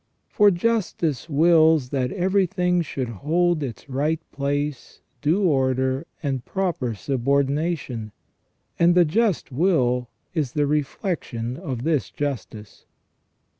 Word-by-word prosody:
For 210 Hz, -1 st, +5 dB
justice 175 Hz, -, -1 dB
wills 160 Hz, -2 st, +4 dB
that 130 Hz, -2 st, -1 dB
everything 180 Hz, -2 st, +1 dB
should 135 Hz, -5 st, -3 dB
hold 160 Hz, -, 0 dB
its 130 Hz, -3 st, -6 dB
right 145 Hz, +4 st, 0 dB
place, 145 Hz, 0 st, -3 dB, 0.2 s
due 170 Hz, +7 st, +2 dB
order, 130 Hz, -2 st, +1 dB, 0.2 s
and 135 Hz, -4 st, -2 dB
proper 160 Hz, -, -2 dB
subordination. 140 Hz, -, -1 dB, 0.7 s
And 175 Hz, +1 st, +5 dB
the 175 Hz, -1 st, +6 dB
just 205 Hz, +1 st, 0 dB
will 125 Hz, -6 st, +1 dB, 0.2 s
is 150 Hz, -7 st, -1 dB
the 145 Hz, -1 st, +1 dB
reflection 145 Hz, -, -2 dB
of 135 Hz, -8 st, -5 dB
this 155 Hz, -3 st, 0 dB
justice. 115 Hz, -7 st, -6 dB
145 Hz, 110 wpm, -23 LUFS, 130-175 Hz, 0.7 s, the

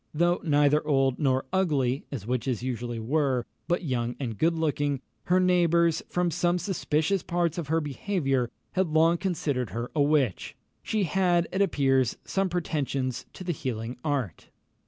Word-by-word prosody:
Though 175 Hz, +3 st, +2 dB
neither 150 Hz, -1 st, +3 dB
old 135 Hz, -3 st, +2 dB
nor 130 Hz, -3 st, +1 dB
ugly 145 Hz, -8 st, +1 dB
(as 125 Hz, -8 st, -5 dB
witches 125 Hz, 0 st, -1 dB
usually 120 Hz, -2 st, -3 dB
were), 130 Hz, 0 st, 0 dB, 0.2 s
but 175 Hz, +1 st, 0 dB
young 120 Hz, -5 st, -1 dB
and 120 Hz, -5 st, -3 dB
good 165 Hz, +7 st, +1 dB
looking, 145 Hz, -3 st, 0 dB, 0.3 s
her 180 Hz, +1 st, +3 dB
neighbours, 170 Hz, -2 st, +3 dB
from 175 Hz, -1 st, 0 dB
some 175 Hz, +2 st, +1 dB
suspicious 180 Hz, -1 st, 0 dB
parts 170 Hz, -1 st, -1 dB
of 160 Hz, -, -4 dB
her 160 Hz, +2 st, +2 dB
behaviour, 140 Hz, -4 st, -1 dB, 0.2 s
had 190 Hz, -1 st, +1 dB
long 165 Hz, +2 st, +3 dB
considered 145 Hz, -, -1 dB
her 115 Hz, +6 st, -5 dB
a 150 Hz, -, +3 dB
witch. 140 Hz, -, +1 dB, 0.3 s
She 215 Hz, -2 st, 0 dB
had, 175 Hz, 0 st, +2 dB
it 190 Hz, -, 0 dB
appears, 135 Hz, -, +2 dB
some 195 Hz, -1 st, 0 dB
pretensions 140 Hz, -7 st, -2 dB
to -, -, -8 dB
the 175 Hz, -1 st, -1 dB
healing 120 Hz, -4 st, -4 dB
art. 135 Hz, -, -2 dB
150 Hz, 155 wpm, -27 LUFS, 130-175 Hz, 0.3 s, neither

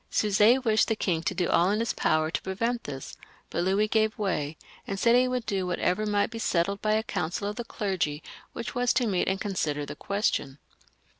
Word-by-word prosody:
Suger 215 Hz, +4 st, +4 dB
wished 220 Hz, -3 st, +3 dB
the 225 Hz, -, +1 dB
king 175 Hz, -6 st, 0 dB
to 185 Hz, -, -2 dB
do 175 Hz, -1 st, 0 dB
all 175 Hz, +2 st, +3 dB
in 210 Hz, +2 st, +1 dB
his 230 Hz, -, 0 dB
power 155 Hz, 0 st, +1 dB
to -, -, -2 dB
prevent 230 Hz, +6 st, -2 dB
this, 135 Hz, -2 st, -7 dB, 0.4 s
but 170 Hz, -, 0 dB
Louis 195 Hz, +3 st, +2 dB
gave 220 Hz, 0 st, +1 dB
way, 160 Hz, -7 st, -2 dB, 0.3 s
and 195 Hz, -1 st, -3 dB
said 235 Hz, +3 st, +4 dB
he 250 Hz, +1 st, +4 dB
would 250 Hz, -2 st, -2 dB
do 190 Hz, -4 st, -1 dB
whatever 180 Hz, +4 st, 0 dB
might 205 Hz, +1 st, +1 dB
be 230 Hz, -, -6 dB
settled 195 Hz, 0 st, 0 dB
by 215 Hz, 0 st, +1 dB
a 220 Hz, +1 st, +1 dB
council 180 Hz, +1 st, -3 dB
of 205 Hz, -, -3 dB
the 240 Hz, -, -4 dB
clergy 185 Hz, -9 st, -2 dB, 0.3 s
which 235 Hz, -, -6 dB
was 245 Hz, 0 st, +2 dB
to 250 Hz, -, +2 dB
meet 190 Hz, -5 st, 0 dB
and 190 Hz, 0 st, 0 dB
consider 155 Hz, -8 st, -2 dB
the -, -, -7 dB
question. 200 Hz, -9 st, -1 dB
200 Hz, 215 wpm, -27 LUFS, 175-220 Hz, 0.4 s, Suger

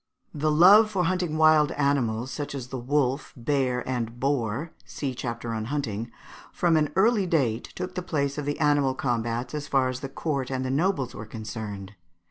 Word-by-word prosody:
The 155 Hz, +1 st, 0 dB
love 190 Hz, +8 st, +7 dB
for 195 Hz, -4 st, 0 dB
hunting 175 Hz, -3 st, 0 dB
wild 155 Hz, -2 st, +5 dB
animals, 130 Hz, -4 st, 0 dB
such 145 Hz, -1 st, -5 dB
as 130 Hz, -2 st, -6 dB
the 130 Hz, -, -4 dB
wolf, 135 Hz, +2 st, 0 dB
bear, 125 Hz, 0 st, 0 dB
and 120 Hz, -2 st, -3 dB
boar 135 Hz, +2 st, -1 dB
(see 135 Hz, -3 st, -4 dB
chapter 115 Hz, -2 st, -4 dB
on 110 Hz, -1 st, -3 dB
Hunting), 115 Hz, -4 st, -3 dB, 0.4 s
from 170 Hz, -2 st, +2 dB
an 150 Hz, -2 st, +2 dB
early 205 Hz, 0 st, +3 dB
date 130 Hz, -10 st, +1 dB
took 180 Hz, 0 st, -5 dB
the 180 Hz, -, -3 dB
place 145 Hz, -5 st, -1 dB
of 145 Hz, -, -4 dB
the 145 Hz, 0 st, -2 dB
animal 145 Hz, -3 st, +2 dB
combats 120 Hz, -1 st, -2 dB
as 150 Hz, -1 st, -4 dB
far 135 Hz, -2 st, +2 dB
as 130 Hz, 0 st, -4 dB
the 135 Hz, -, -6 dB
court 140 Hz, -2 st, -2 dB
and 130 Hz, -1 st, -2 dB
the 130 Hz, -, -1 dB
nobles 140 Hz, -3 st, 0 dB
were 105 Hz, -, -8 dB
concerned. 105 Hz, -3 st, -7 dB
140 Hz, 185 wpm, -26 LUFS, 120-155 Hz, 0.4 s, love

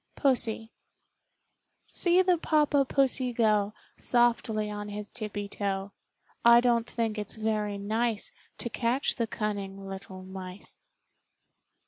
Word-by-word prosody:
Pussy 230 Hz, -5 st, +1 dB, 1.1 s
See 360 Hz, +1 st, +3 dB
the 360 Hz, -2 st, +3 dB
Papa 295 Hz, -3 st, +3 dB
Pussy 265 Hz, -2 st, +1 dB
go 215 Hz, -2 st, +2 dB, 0.2 s
Softly 230 Hz, -3 st, +2 dB
on 205 Hz, 0 st, -5 dB
his 210 Hz, 0 st, -6 dB
tippie 210 Hz, -3 st, -5 dB
toe. 200 Hz, -1 st, -3 dB, 0.5 s
I 235 Hz, 0 st, +8 dB
don 240 Hz, -1 st, +3 dB
t -, -, -13 dB
think 225 Hz, -2 st, -1 dB
it's 210 Hz, -, -4 dB
very 215 Hz, -2 st, -1 dB
nice 220 Hz, +2 st, -1 dB, 0.3 s
To 235 Hz, -, -3 dB
catch 245 Hz, +3 st, +1 dB
the 230 Hz, -2 st, 0 dB
cunning 200 Hz, -2 st, -4 dB
little 190 Hz, -1 st, -8 dB
mice. 185 Hz, 0 st, -8 dB
220 Hz, 120 wpm, -29 LUFS, 205-240 Hz, 1.1 s, I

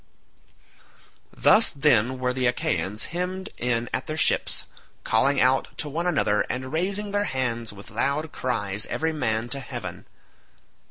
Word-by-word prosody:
Thus 225 Hz, -, +5 dB
then 130 Hz, -4 st, +2 dB
were 125 Hz, 0 st, 0 dB
the 130 Hz, -1 st, +1 dB
Achaeans 120 Hz, -6 st, 0 dB
hemmed 185 Hz, +2 st, -3 dB
in 120 Hz, -1 st, 0 dB
at -, -, -2 dB
their 155 Hz, 0 st, -3 dB
ships, -, -, +2 dB, 0.4 s
calling 135 Hz, +5 st, +2 dB
out 130 Hz, +1 st, +3 dB
to 150 Hz, -, -3 dB
one 165 Hz, +5 st, -2 dB
another 105 Hz, -11 st, +2 dB
and 130 Hz, +2 st, -4 dB
raising 200 Hz, +5 st, 0 dB
their 205 Hz, 0 st, +1 dB
hands 120 Hz, -, -2 dB
with 100 Hz, +2 st, -12 dB
loud 140 Hz, +7 st, 0 dB
cries 105 Hz, -5 st, -2 dB
every 160 Hz, 0 st, -1 dB
man 115 Hz, -6 st, 0 dB
to 140 Hz, -, -2 dB
heaven. 135 Hz, -, -7 dB
130 Hz, 145 wpm, -25 LUFS, 115-160 Hz, 0.4 s, Thus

